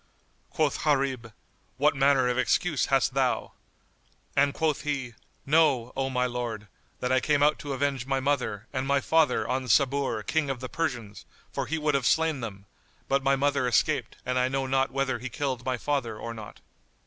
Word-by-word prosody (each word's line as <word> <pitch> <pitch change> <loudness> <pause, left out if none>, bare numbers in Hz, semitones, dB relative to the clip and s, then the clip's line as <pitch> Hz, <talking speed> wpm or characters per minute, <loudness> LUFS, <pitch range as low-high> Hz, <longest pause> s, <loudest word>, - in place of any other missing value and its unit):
Quoth 155 -3 0
Gharib, 135 -6 0 0.5
"What 145 +2 +3
manner 135 -2 +3
of 125 - +1
excuse 140 +5 +1
hast 135 -1 +2
thou?"; 130 -2 0 0.8
And 140 +1 +4
quoth 155 0 0
he, 140 -5 -3 0.3
"Know, 140 -5 +3
O 135 0 -1
my 125 -1 0
lord, 120 -4 -4 0.3
that 125 - -1
I 130 - +4
came 145 +1 +2
out 150 +1 +3
to 145 -1 -4
avenge 135 -1 -1
my 135 -1 +1
mother 130 -7 -1
and 130 0 -2
my 140 0 +3
father 160 -1 +2
on 130 0 -1
Sabur, 140 +3 +2
King 160 -3 0
of 135 -2 -2
the 130 0 -6
Persians; 120 -11 -3 0.3
for - - -2
he 160 - -1
would 150 -1 0
have 135 -4 +1
slain 160 0 +2
them; 100 -5 -7 0.4
but 140 0 +2
my 135 0 +3
mother 140 -1 +1
escaped 120 - +1
and 125 0 0
I 125 - +2
know 135 +1 -1
not 135 0 +1
whether 135 -3 -1
he 130 +2 -5
killed 130 -1 -3
my 130 -1 0
father 120 -5 -2
or 115 +1 -6
not." 110 -2 -10
135 Hz, 185 wpm, -27 LUFS, 125-145 Hz, 0.8 s, And